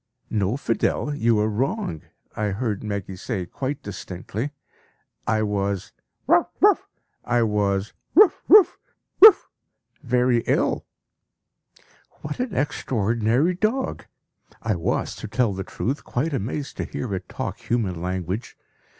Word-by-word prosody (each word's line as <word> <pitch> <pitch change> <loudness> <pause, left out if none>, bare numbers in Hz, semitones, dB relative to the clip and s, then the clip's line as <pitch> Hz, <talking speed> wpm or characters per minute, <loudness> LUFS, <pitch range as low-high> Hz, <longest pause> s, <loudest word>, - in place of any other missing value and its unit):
"No, 105 +2 0
Fidel, 140 +3 0
you 115 -5 +2
are 105 +1 +2
wrong," 120 - -2 0.3
I 105 - -1
heard 105 0 -2
Meggy 100 -3 -4
say 95 0 -4
quite 135 +9 -4
distinctly. 100 +5 -5 0.8
"I 110 0 +2
was 100 -2 -2 0.3
bow - - +4
wow! - - +6 0.4
I 120 -1 +2
was 100 -2 0 0.2
bow! 400 +2 +8 0.2
wow! 415 -3 +9 0.6
wow! 430 0 +12 0.7
very 125 -2 +2
ill." - - +1 1.4
What 150 0 -5
an 245 -6 -2
extraordinary 120 - +1
dog! 220 +8 -1 0.6
I 110 - +1
was, 85 -3 -1
to - - -6
tell 115 -1 +1
the 95 0 -4
truth, 130 +9 -3
quite 145 +6 -2
amazed 135 +4 -3
to - - -2
hear 120 -6 -4
it 95 -1 -5
talk - - -4
human 100 -8 -1
language. 90 +4 -4
115 Hz, 125 wpm, -24 LUFS, 100-135 Hz, 1.4 s, wow